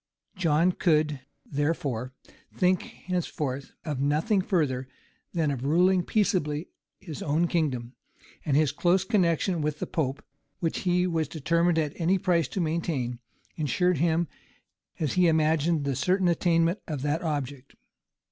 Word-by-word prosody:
John 170 -1 +3
could, 155 -5 +1 0.3
therefore, 140 -4 -2 0.4
think 185 -1 +2
henceforth 150 -7 -4
of 150 -5 -3
nothing 155 +9 +2
further 145 -10 0 0.4
than 160 -4 0
of 130 -2 -4
ruling 180 +6 +4
peaceably 170 -6 0 0.3
his 165 -7 -8
own 155 +4 +1
kingdom; 135 -8 -1 0.5
and 140 -2 +2
his 150 -3 +3
close 175 +5 +2
connections 180 -4 +1
with 150 0 -1
the - - -3
pope, 145 -6 -2 0.3
which 165 -2 -1
he 180 -1 +2
was 165 -4 0
determined 170 +3 +1
at 150 -3 0
any 180 +4 +3
price 175 -3 +1
to - - -4
maintain, 155 -8 -1 0.4
insured 165 +3 +1
him, 165 +1 +2 0.7
as 150 -5 0
he 180 -1 +4
imagined 160 0 +2
the 140 -2 0
certain 180 +7 +2
attainment 170 +2 +2
of 145 -4 -4
that 150 +3 0
object. 145 -5 -4
160 Hz, 140 wpm, -27 LUFS, 145-175 Hz, 0.7 s, ruling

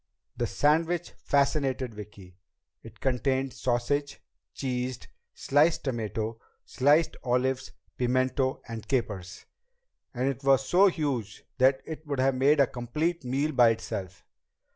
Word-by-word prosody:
The - - -1
sandwich 165 +3 +1
fascinated 135 -3 0
Vicki. 100 -3 -11 0.5
It 110 -2 -14
contained 130 0 0
sausage, 135 +4 -1 0.4
cheese, 125 -2 -2 0.4
sliced 150 +4 +2
tomato, 115 -3 -3 0.3
sliced 150 +5 +2
olives, 130 +1 0 0.3
pimento, 130 +1 0
and 115 -2 -7
capers. 105 -8 -3 0.7
And 125 +2 0
it 135 0 -3
was 135 -1 +3
so 190 +3 +5
huge 135 - -2 0.2
that 130 +1 +4
it 155 -1 -7
would 140 -2 -2
have 135 +1 +3
made 140 +4 +3
a 140 - +7
complete 150 +8 -2
meal 135 +5 0
by 125 -4 +5
itself. 95 -5 -4
130 Hz, 120 wpm, -28 LUFS, 120-145 Hz, 0.7 s, a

